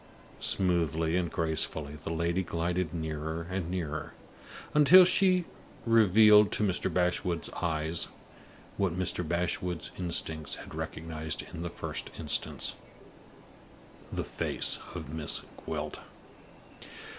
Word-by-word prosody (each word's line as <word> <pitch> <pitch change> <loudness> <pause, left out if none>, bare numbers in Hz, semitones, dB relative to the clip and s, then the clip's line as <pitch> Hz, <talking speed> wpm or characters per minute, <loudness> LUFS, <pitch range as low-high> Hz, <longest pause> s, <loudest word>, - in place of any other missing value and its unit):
Smoothly 85 -3 +1
and 90 -2 0
gracefully 80 -2 0
the 75 - -8
lady 85 +2 0
glided 85 -1 -2
nearer 80 0 -4
and 95 -3 -3
nearer, 80 -3 -4 0.6
until 170 +5 +8
she 185 -1 +3 0.4
revealed 105 -2 +6
to - - +1
Mr. 95 -3 0
Bashwood's 90 -1 0
eyes, 80 0 0 0.7
what 95 -3 0
Mr. 90 -1 +1
Bashwood's 85 0 -2
instincts 80 -4 -2
had - - -11
recognized 80 -1 -4
in 80 - -6
the 85 - -3
first - - -4
instance - - 0 1.4
the - - -2
face - - 0 0.2
of 80 -4 -6
Miss 80 -2 0 0.2
Gwilt. - - -4
85 Hz, 110 wpm, -30 LUFS, 80-90 Hz, 1.4 s, until